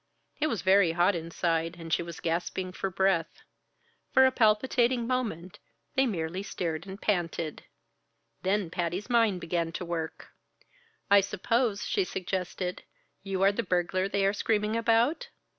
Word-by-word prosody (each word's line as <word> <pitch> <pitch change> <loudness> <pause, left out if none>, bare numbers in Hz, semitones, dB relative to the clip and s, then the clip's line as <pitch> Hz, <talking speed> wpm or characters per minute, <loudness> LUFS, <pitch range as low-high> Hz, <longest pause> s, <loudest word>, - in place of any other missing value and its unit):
It 305 - +2
was 230 -9 -2
very 190 -3 +5
hot 175 +4 +3
inside 165 0 -1
and 165 -1 -5
she - - +2
was 170 -1 -7
gasping 175 +2 -2
for 195 +1 -3
breath. 185 -2 0 0.7
For 265 - +6
a 260 - +4
palpitating 240 +1 +2
moment 220 -9 -3 0.3
they 265 0 +3
merely 175 -3 -2
stared 170 -3 -4
and 190 +1 -8
panted. 170 -6 -2 0.8
Then 190 -2 0
Patty's 180 +7 -3
mind 225 -6 +3
began 170 -1 -1
to 180 - -4
work. 165 -2 -5 0.8
"I 200 0 +8
suppose," 210 +3 0
she 395 - +1
suggested, 185 - -3 0.4
"you 195 -1 -2
are 195 - +6
the 205 - -1
burglar 185 -1 0
they 200 0 +1
are 195 - +3
screaming 210 +1 0
about?" 235 - +2
190 Hz, 145 wpm, -29 LUFS, 170-220 Hz, 0.8 s, I